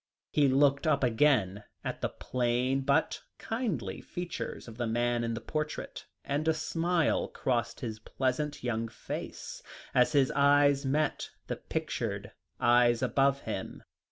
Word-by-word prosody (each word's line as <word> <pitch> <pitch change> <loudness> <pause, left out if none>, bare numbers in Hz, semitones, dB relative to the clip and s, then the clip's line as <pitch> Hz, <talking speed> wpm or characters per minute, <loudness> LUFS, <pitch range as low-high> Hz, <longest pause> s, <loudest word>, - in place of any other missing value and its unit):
He 145 -2 +4
looked 140 +3 +3
up 140 -3 +2
again 115 -6 +3 0.2
at - - -4
the - - 0
plain 125 +2 0
but 140 +4 +1 0.2
kindly 225 -6 -3
features 175 -6 -5
of 115 -1 -10
the 120 - 0
man 120 +1 +1
in 115 0 -1
the 115 - -5
portrait, 150 +5 -4 0.2
and 145 +3 -1
a 160 - +3
smile 165 +1 +1
crossed 120 -2 -2
his 110 -3 -4
pleasant 130 +6 -2
young 115 -2 -1
face, 110 - -7 0.3
as 125 +3 +4
his 140 -3 +4
eyes 140 0 +4
met 150 +2 0 0.2
the - - -4
pictured - - -3 0.3
eyes 120 -1 +4
above 140 0 +2
him. - - -5
135 Hz, 140 wpm, -30 LUFS, 120-150 Hz, 0.3 s, He